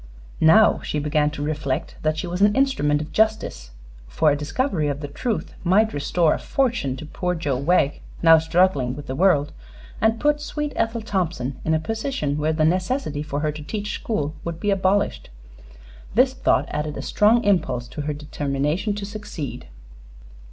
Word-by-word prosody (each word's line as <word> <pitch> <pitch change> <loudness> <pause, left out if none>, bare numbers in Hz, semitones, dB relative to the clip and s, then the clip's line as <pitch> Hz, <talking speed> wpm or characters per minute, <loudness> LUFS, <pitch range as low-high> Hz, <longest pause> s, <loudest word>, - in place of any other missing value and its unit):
Now 210 +8 +6
she - - -3
began 150 0 +1
to 150 -1 -6
reflect 145 -3 -2
that 155 0 0
she 155 - -3
was 180 +2 -4
an 205 0 +5
instrument 150 - +2
of 150 - -11
justice, 215 - 0 0.4
for 155 - +2
a - - +2
discovery 155 - -1
of 140 -1 -2
the 145 - -5
truth 220 - -3
might 210 +5 +3
restore 155 +3 +2
a - - -3
fortune 235 - 0
to 155 - -8
poor 180 +3 -2
Joe 145 -6 -1
Wegg, 145 0 +1 0.2
now 165 -1 +8
struggling 160 -6 +2
with 145 0 -8
the 130 - -4
world, 150 -2 +3 0.5
and 220 0 +2
put 295 0 +2
sweet 295 0 -4
Ethel 225 0 -1
Thompson 160 - -2
in 160 - +1
a - - +1
position 220 - -2
where 155 +1 +1
the 155 0 +1
necessity 180 - 0
for 150 -1 -3
her 155 0 0
to 150 +1 -8
teach 210 +6 -4
school 155 -10 -2
would 170 -1 -5
be 205 +3 0
abolished. 195 +1 0 0.9
This 255 +2 +4
thought 265 - +2
added 150 0 -3
a - - -5
strong 225 +3 +3
impulse 150 -12 +1
to 150 - -6
her 150 +1 -2
determination 150 +6 -2
to 205 -1 -5
succeed. 200 - -7
160 Hz, 180 wpm, -23 LUFS, 145-210 Hz, 0.9 s, now